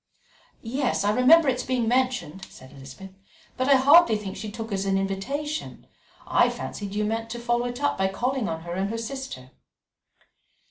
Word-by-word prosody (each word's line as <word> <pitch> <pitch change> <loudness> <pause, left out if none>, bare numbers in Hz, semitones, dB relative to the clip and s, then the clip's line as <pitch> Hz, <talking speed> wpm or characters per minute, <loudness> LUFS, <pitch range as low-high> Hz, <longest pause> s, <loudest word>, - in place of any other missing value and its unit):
"Yes, 255 -1 -1
I 205 - +2
remember 275 +8 +5
its 250 -1 +1
being 250 -3 -1
mentioned," 245 -8 -1
said 130 +1 -15
Elizabeth, 140 +7 -12 0.4
"but 255 +2 -1
I 280 - +7
hardly 275 -2 +6
think 200 -2 -7
she 215 - -6
took 225 +1 -7
it - - -2
as 195 0 -2
an 195 0 +2
invitation. 270 +11 -4 0.4
I - - +3
fancied 200 -1 -6
you 210 0 0
meant 225 +1 -3
to 240 +1 -5
follow 240 0 0
it 245 +3 -5
up 285 - 0
by 190 - +2
calling 245 +5 -2
on 160 0 -4
her 170 +1 -7
and 190 +2 -2
her 230 - -3
sister." 230 - -7
225 Hz, 185 wpm, -25 LUFS, 195-260 Hz, 0.4 s, I